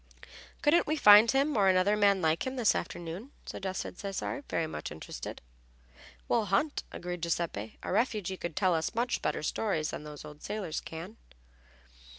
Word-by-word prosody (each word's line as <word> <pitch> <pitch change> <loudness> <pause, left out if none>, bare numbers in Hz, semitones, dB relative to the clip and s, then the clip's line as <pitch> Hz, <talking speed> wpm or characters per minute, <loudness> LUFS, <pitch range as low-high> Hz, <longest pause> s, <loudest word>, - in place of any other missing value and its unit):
"Couldn't 315 +3 +4
we 310 - +1
find 210 -5 +8
him 275 +3 +2
or 200 -3 +4
another 185 +3 +4
like 195 -4 +3
him, 260 - -3
this 240 -5 +3
afternoon?" 175 +8 -5 0.2
suggested 190 -1 -5
Cesare, 200 +8 -4
very 165 - 0
much 155 - -6
interested. 75 -4 -7 0.8
"We'll 230 -3 +2
hunt," 205 +10 +1
agreed 175 0 -5
Giuseppe. 165 -11 -2
"A - - -3
refugee 210 -6 0
could 170 -3 -5
tell 185 -2 +3
us 160 +4 -1
much 240 +1 0
better 150 - -1
stories 160 -3 -1
than - - -6
those 150 0 -9
old 150 0 -11
sailors 195 -7 -3
can." 170 +7 -8
190 Hz, 160 wpm, -30 LUFS, 165-220 Hz, 0.8 s, find